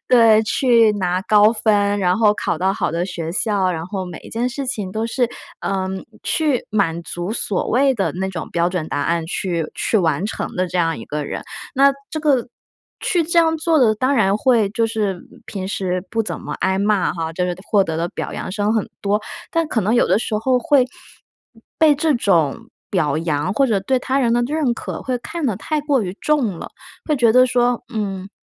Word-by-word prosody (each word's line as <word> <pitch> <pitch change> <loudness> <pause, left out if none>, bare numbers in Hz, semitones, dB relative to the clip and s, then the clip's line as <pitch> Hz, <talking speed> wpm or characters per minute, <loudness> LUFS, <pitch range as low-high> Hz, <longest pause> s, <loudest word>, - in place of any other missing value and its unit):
对， 230 -3 +6
去 230 -2 +4
拿 185 -3 -1
高 210 +1 +5
分， 205 -2 +2
然 180 -1 +2
后 215 -1 +4
考 170 - -2
到 190 +3 +1
好 - - -1
的 170 +1 -1
学 170 -3 -5
校 205 0 0
啊， 185 - +2
然 165 0 -4
后 190 -1 -4
每 175 -3 -8
一 - - -13
件 240 +3 -1
事 275 +2 -4
情 205 -7 -3
都 220 +2 -2
是， 245 +1 0 0.3
嗯， 190 -1 -3 0.2
去 300 -6 0
满 170 -6 0
足 175 +4 -4
所 205 -4 -1
谓 270 +3 +3
的 200 - -1
那 190 +2 -3
种 170 -4 -6
标 170 0 +1
准 180 -3 -3
答 145 - -2
案， 165 +1 0
去 170 -2 -2
去 220 - +1
完 165 0 +1
成 - - -5
的 185 0 -1
这 180 - -2
样 165 -2 +1
一 - - -8
个 150 0 -4
人。 - - -5 0.3
那 275 +1 +5 0.2
这 310 - -4
个 275 -6 +2 0.5
去 345 -3 +1
这 340 +2 -3
样 325 -1 +4
做 320 -1 +2
的， 220 -4 +4
当 260 +5 +1
然 200 -5 +3
会 230 -3 +3
就 225 +1 +1
是 205 -5 -2 0.2
平 190 -3 -5
时 185 -2 -2
不 225 0 0
怎 - - -5
么 - - -6
挨 190 0 +1
骂 200 -2 +1
哈， 165 -1 -4
就 180 +2 -1
是 180 -1 -2
获 205 -2 +4
得 160 -3 -3
的 170 +1 -1
表 - - -5
扬 - - -5
声 205 +2 0
很 220 -3 0
多， 205 +1 +1 0.3
但 330 -1 +1
可 235 - 0
能 210 +3 0
有 240 - +4
的 - - +3
时 215 - -2
候 250 +3 +2
会， 285 -4 +4 1.0
被 310 -2 +6
这 305 0 +2
种 170 - +1 0.2
表 155 -6 +1
扬 160 +1 -1
或 270 +6 +2
者 215 -5 +1
对 260 +6 +1
他 270 +2 0
人 235 -2 +2
的 240 - +3
认 295 -4 0
可， - - -6
会 255 -1 -2
看 325 +6 -5
得 220 -8 0
太 305 +7 -2
过 290 -3 +1
于 185 0 -5
重 250 - +1
了， - - -6 0.4
会 300 - 0
觉 235 -4 +4
得 255 +1 +6
说， 245 -1 +1
嗯 195 -3 -3
210 Hz, 235 characters per minute, -20 LUFS, 185-250 Hz, 1.0 s, 对